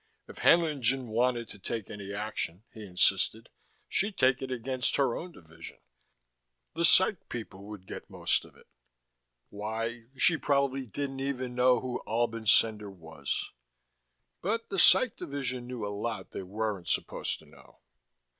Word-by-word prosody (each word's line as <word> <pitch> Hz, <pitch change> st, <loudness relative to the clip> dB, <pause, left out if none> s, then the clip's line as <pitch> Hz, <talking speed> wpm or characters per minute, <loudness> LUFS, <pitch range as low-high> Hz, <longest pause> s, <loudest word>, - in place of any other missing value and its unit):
If -, -, -11 dB
Haenlingen 135 Hz, -7 st, +3 dB
wanted 120 Hz, +1 st, +1 dB
to -, -, -7 dB
take 110 Hz, +2 st, -4 dB
any 100 Hz, -2 st, -7 dB
action, 105 Hz, -3 st, -4 dB
he 110 Hz, -, -9 dB
insisted, 90 Hz, -3 st, +1 dB, 0.4 s
she'd 205 Hz, +1 st, 0 dB
take 130 Hz, 0 st, +4 dB
it 135 Hz, -, -4 dB
against 130 Hz, +1 st, 0 dB
her 135 Hz, -4 st, +2 dB
own 180 Hz, +2 st, -6 dB
division. 80 Hz, -, -11 dB, 1.0 s
The 170 Hz, +1 st, +2 dB
Psych 190 Hz, +1 st, +5 dB
people 105 Hz, -4 st, -7 dB
would 105 Hz, -3 st, -9 dB
get -, -, -8 dB
most -, -, 0 dB
of -, -, -16 dB
it. -, -, -19 dB, 0.9 s
Why, 115 Hz, +3 st, -4 dB
she 165 Hz, +3 st, +4 dB
probably 140 Hz, -3 st, +1 dB
didn't 135 Hz, +4 st, -4 dB
even 130 Hz, -2 st, -2 dB
know 125 Hz, 0 st, +4 dB
who 125 Hz, -1 st, -3 dB
Albin 115 Hz, 0 st, -1 dB
Cendar 105 Hz, -1 st, +4 dB
was.... 80 Hz, -6 st, -5 dB, 0.9 s
But 225 Hz, +5 st, -1 dB
the 195 Hz, -, -1 dB
Psych 200 Hz, +7 st, +6 dB
division 130 Hz, -3 st, -3 dB
knew 125 Hz, -4 st, -4 dB
a 100 Hz, -, -3 dB
lot 105 Hz, -2 st, -4 dB
they -, -, -5 dB
weren't 100 Hz, -1 st, -3 dB
supposed -, -, -1 dB
to -, -, -18 dB
know. -, -, -19 dB
120 Hz, 150 wpm, -30 LUFS, 105-135 Hz, 1.0 s, Psych